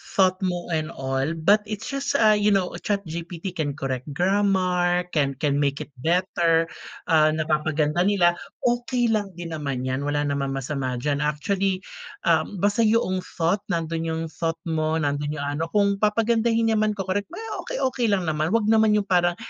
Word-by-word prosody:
Thought 185 -1 +3
mo 175 -1 -4
and 155 -1 0
all 135 +4 -1
but 195 +7 +4
it's 215 +1 -5
just, 275 +1 -2
ah, 220 -4 +5
you 210 0 +2
know, 195 -3 +2
ChatGPT 175 -2 -4
can 150 -5 -2
correct 130 -3 -4
grammar, 180 -1 +2
can 140 -3 +1
can 145 -1 0
make 140 -1 0
it - - -18
better, 165 +1 +2 0.5
ah, 155 -1 +5
napapaganda 155 0 0
nila, 180 -4 +4 0.3
okey 240 0 +1
lang 205 -2 0
din 170 -1 -6
naman 140 -5 -3
'yan. 130 +1 -1
Wala 145 0 0
naman 140 -1 -1
masama 135 -1 -3
diyan. 140 +3 -1
Actually, 185 +6 -1 0.4
uhm, 205 - +2
basta 205 +3 +3
'yong 215 -4 +2 0.2
thought, 175 +4 +1
nandun 165 -1 -2
yung 160 0 -2
thought 165 +1 -2
mo, 160 -1 0
nandun 145 0 -1
yung 145 - -3
ano, 165 - -1
kung 200 0 +2
papagandahin 225 +1 +2
niya 220 - +2
man, 215 -1 +1
ko-correct, 195 +1 -2
may 350 +7 -8 0.2
okey - - -3
okey 260 -2 0
lang 200 -3 +1
naman. 155 0 0
'Wag 225 -2 +2
naman 220 -1 +4
yung 210 -1 +1
parang 175 -2 +3
175 Hz, 175 wpm, -24 LUFS, 150-205 Hz, 0.5 s, ah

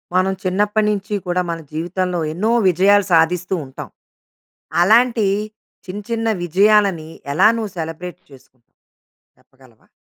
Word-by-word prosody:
మనం 185 +1 +2
చిన్నప్పటి 210 +3 +1
నించీ 205 0 -2
కూడా 180 +1 0
మన 165 - -4
జీవితంలో 175 +2 -2
ఎన్నో 210 +7 0 0.2
విజయాలు 195 +3 +3
సాధిస్తూ 175 +3 +2
ఉంటాం. 130 0 -9 0.9
అలాంటీ 230 +2 +3 0.6
చిన్న 190 +3 -6
చిన్న 225 0 -1 0.2
విజయాలని, 190 -2 +2 0.2
ఎలా 155 - +5
నువ్వు 220 -3 -4
సెలబ్రేట్ 170 +2 -6
చేసుకుంటావు? 130 -2 -20 0.7
చెప్పగలవా? 130 -4 -24
185 Hz, 115 wpm, -19 LUFS, 165-205 Hz, 0.9 s, ఎలా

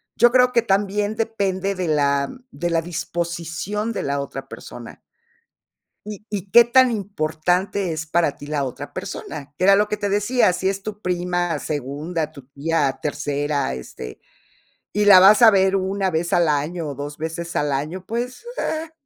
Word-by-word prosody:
Yo 240 +1 +5
creo 250 0 +5
que 235 -2 +3
también 205 0 0
depende 200 -4 -1
de 180 -2 -2
la 140 -2 +1 0.2
de 175 -3 -3
la 165 - +2
disposición 170 +5 -3
de - - -3
la 140 0 -1
otra 135 -1 -6
persona 120 -3 -10 1.1
y 210 -1 -8
y 200 -2 -4
qué 235 - +8
tan 255 +2 +5
importante 185 -1 -1
es 160 0 -5
para 165 -3 +1
ti 145 - -11
la 150 -2 -1
otra 130 -2 -6
persona, 145 -1 -7
era 195 +2 +6
lo 210 +1 +2
que 210 - -2
te 205 -1 -2
decía, 205 +2 +2
si 185 +1 -2
es 195 0 -1
tu 210 0 -6
prima, 175 -3 -1
segunda, 150 +3 -3
tu 140 -4 -14
tía, 140 -1 -1
tercera, 145 - -1
este, 60 0 -9 0.8
y 210 - +2
la 195 -3 +9
vas 205 +4 +7
a 230 - +10
ver 195 -1 +3
1, 190 0 -1
vez 165 +1 -2
al 170 -2 +3
año 150 +3 -1
o 140 - -4
2 145 +2 -7
veces 165 +2 -5
al 145 -1 +1
año, 155 +7 -3
pues, 245 - -4
eh 320 +1 -3
175 Hz, 175 wpm, -22 LUFS, 150-205 Hz, 1.1 s, a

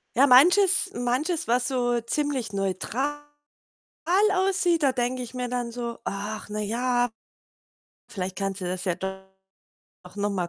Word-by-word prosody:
Ja, 270 +4 +5
manches 365 +9 +6
manches, 295 +8 -1
was 245 +2 +2
so 245 -2 0
ziemlich 255 -3 -2
neutral 210 +9 -2 1.1
aussieht, 370 -4 +2
da 275 - +4
denke 250 0 -2
ich 245 +1 -9
mir 250 -1 -3
dann 245 -1 -3
so: 235 -1 -5
„Ach 205 +2 -5
na 210 - -4
ja, 245 +3 0 1.0
vielleicht 185 -1 -5
kannst 195 -1 -3
du 180 - -4
das 180 +1 -3
ja 180 -3 0
doch 190 +1 -5 1.0
noch 205 0 -1
mal 180 -3 -2
245 Hz, 145 wpm, -25 LUFS, 205-275 Hz, 1.1 s, manches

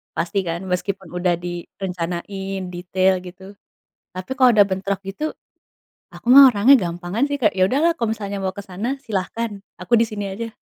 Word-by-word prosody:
Pasti 175 +4 -1
kan? 170 +2 -3
Meskipun 190 0 -3
udah 180 0 0
direncanain 180 +2 -5
detail 185 +1 +1
gitu. 185 +2 -11 0.6
Tapi 185 +4 -8
kalau 255 -2 +6
ada 210 - +7
bentrok 190 0 -2
gitu, 300 +11 -3 0.8
aku - - -15
mah 275 -1 +10
orangnya 235 +5 +5 0.2
gampangan 175 +8 -2
sih, 285 - -1
Kak, 210 -4 +2
ya 185 - +1
udah 270 - +1
lah 340 - +4
kalau 230 -8 -2
misalnya 200 -2 -5
mau 190 0 -1
ke 200 - -4
sana, 215 +9 -4
silahkan. 220 +2 -3 0.3
Aku 185 +5 0
di - - +5
sini 205 -1 -4
aja. 230 +4 -5
195 Hz, 175 wpm, -21 LUFS, 180-215 Hz, 0.8 s, mah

